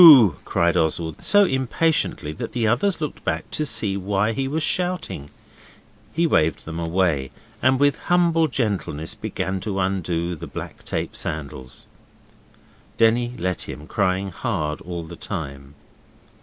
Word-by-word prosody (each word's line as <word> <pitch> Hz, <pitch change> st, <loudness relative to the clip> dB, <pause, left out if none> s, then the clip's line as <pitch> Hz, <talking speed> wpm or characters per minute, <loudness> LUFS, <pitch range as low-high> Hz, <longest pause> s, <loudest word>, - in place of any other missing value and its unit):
cried 85 Hz, +1 st, +2 dB
Oswald, 80 Hz, -1 st, 0 dB
so 205 Hz, 0 st, +6 dB
impatiently 130 Hz, -, +1 dB
that 75 Hz, -, -6 dB
the 120 Hz, -2 st, 0 dB
others 135 Hz, -, +2 dB
looked 150 Hz, -2 st, -4 dB
back -, -, -2 dB
to 155 Hz, -, -1 dB
see 110 Hz, -7 st, +1 dB
why 100 Hz, +2 st, +1 dB
he 135 Hz, +3 st, -1 dB
was 155 Hz, +3 st, -1 dB
shouting. 175 Hz, -, -2 dB, 0.8 s
He 170 Hz, +2 st, +1 dB
waved 80 Hz, -, +2 dB
them 80 Hz, +1 st, -5 dB
away, 85 Hz, -5 st, +1 dB, 0.3 s
and 130 Hz, 0 st, +4 dB
with 145 Hz, 0 st, +4 dB
humble 170 Hz, -2 st, +4 dB
gentleness 100 Hz, -, -2 dB
began 95 Hz, 0 st, -3 dB
to 100 Hz, 0 st, -3 dB
undo 90 Hz, -2 st, -1 dB
the 75 Hz, -, -8 dB
black -, -, -7 dB
tape -, -, -3 dB
sandals. 70 Hz, -4 st, -5 dB, 1.1 s
Denny 120 Hz, +2 st, +3 dB
let 95 Hz, -1 st, -2 dB
him, 75 Hz, -, -7 dB
crying 95 Hz, +1 st, 0 dB
hard 75 Hz, -2 st, -2 dB
all 85 Hz, -1 st, -5 dB
the 85 Hz, +1 st, -9 dB
time. 70 Hz, -7 st, -6 dB
95 Hz, 140 wpm, -23 LUFS, 80-130 Hz, 1.1 s, so